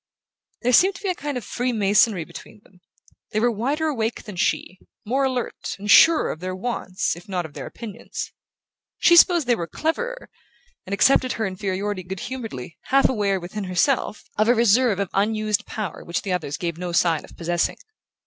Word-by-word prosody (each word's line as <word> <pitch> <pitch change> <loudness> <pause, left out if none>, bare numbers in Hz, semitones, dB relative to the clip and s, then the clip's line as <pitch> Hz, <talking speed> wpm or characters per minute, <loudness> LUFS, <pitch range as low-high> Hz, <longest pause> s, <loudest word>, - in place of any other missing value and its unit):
There 250 +1 +2
seemed 380 +8 +5
to - - -11
be 395 - -1
a - - +2
kind 290 -5 -4
of 245 - -6
freemasonry 215 -5 +2
between 210 - -12
them; 180 -1 -24 0.5
they 215 - +2
were 240 +2 +3
wider 275 +9 -1
awake 235 -7 -1
than 210 -4 -9
she, 185 +1 -1 0.3
more 265 +5 +1
alert, 255 -9 -3
and 205 +1 -1
surer 325 -1 +7
of 155 - -7
their 185 +1 -4
wants 185 -4 -2
if 175 +3 -14
not 180 -3 -2
of 155 - -10
their - - -7
opinions. 225 -4 -7 0.7
She 345 - +5
supposed 345 -2 +6
they 240 - +3
were 170 -6 -4
"cleverer", 480 - -3 0.6
and 195 - -4
accepted 255 +4 +4
her 220 - -2
inferiority 195 +1 -3
good 185 0 -7
humouredly, 225 - -6
half 275 +1 +4
aware, 200 -5 0
within 190 +4 -6
herself, 205 +5 0 0.2
of 215 - +4
a 245 - +5
reserve 235 -1 +4
of 200 -2 -2
unused 215 +1 0
power 210 -5 -5
which 170 - -3
the 190 - -2
others 160 -4 -3
gave 170 -1 -4
no 180 -1 -3
sign 165 -2 +2
of - - -15
possessing. 170 0 0
210 Hz, 185 wpm, -23 LUFS, 185-250 Hz, 0.7 s, surer